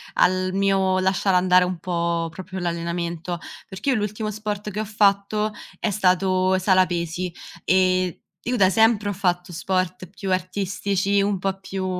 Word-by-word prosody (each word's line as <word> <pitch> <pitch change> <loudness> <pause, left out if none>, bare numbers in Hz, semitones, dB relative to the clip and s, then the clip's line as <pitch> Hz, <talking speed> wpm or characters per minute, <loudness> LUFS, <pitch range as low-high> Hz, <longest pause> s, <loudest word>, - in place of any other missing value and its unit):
al 185 0 +2
mio 195 -1 +2
lasciar 190 +1 +1
andare 180 0 +5
un 180 -2 -4
po' 170 -1 -1
proprio 185 +2 -7
l'allenamento, 170 0 -3 0.3
perché 190 +8 -4
io - - +2
l'ultimo 210 0 -2
sport 210 0 -4
che 210 +1 -5
ho - - -3
fatto 210 +1 +1 0.3
è 220 - 0
stato 185 -1 +2
sala 185 -1 +4
pesi 175 0 -3 0.3
e 185 -1 +2 0.2
io 250 +1 -1
da 190 -5 +5
sempre 220 0 +3
ho - - -1
fatto 180 -2 -1
sport 185 +1 -2
più 195 0 -5
artistici, 195 +1 0
un 200 -1 0
po' 195 +1 -2
più, 190 -1 -4
185 Hz, 155 wpm, -23 LUFS, 180-200 Hz, 0.3 s, andare